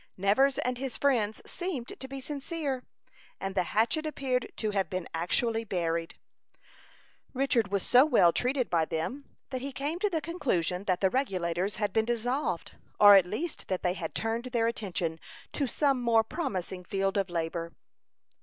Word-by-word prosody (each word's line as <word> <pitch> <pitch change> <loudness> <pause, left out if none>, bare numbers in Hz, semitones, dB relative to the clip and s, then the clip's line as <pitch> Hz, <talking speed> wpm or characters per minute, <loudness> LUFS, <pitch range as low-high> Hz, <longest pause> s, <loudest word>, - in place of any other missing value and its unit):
Nevers 240 +9 +3
and 250 0 -1
his 265 -1 -3
friends 230 -7 +1
seemed 340 -10 -4
to 265 - -6
be 270 +1 -6
sincere, 280 -1 -3 0.6
and 195 0 -3
the 190 - +2
hatchet 240 - +1
appeared 260 -4 -1
to 215 -1 -2
have 195 -2 0
been 185 -3 -3
actually 225 +8 0
buried. 170 -5 -2 1.2
Richard 250 -5 +2
was 200 -1 -1
so 250 +1 +6
well 230 - +5
treated 255 0 +1
by 165 -2 +2
them, 165 - -3 0.3
that 255 -1 -3
he 275 +1 -4
came 290 +5 -3
to 415 - +2
the 330 -4 0
conclusion 200 - -1
that 185 -2 0
the 190 -1 +3
Regulators 190 -6 -1
had 205 -1 -1
been 220 0 +2
dissolved, 240 +4 -1 0.3
or 205 -1 +10
at 190 -3 +7
least 300 - -4
that 185 -1 -2
they 180 -1 +2
had 170 -4 -5
turned 225 +2 -1
their 240 -2 0
attention 185 -8 -2 0.3
to 280 - 0
some 275 0 +1
more 230 -2 +4
promising 195 - -4
field 195 +1 -1
of 195 -2 0
labor. 170 0 -3
225 Hz, 170 wpm, -29 LUFS, 185-270 Hz, 1.2 s, or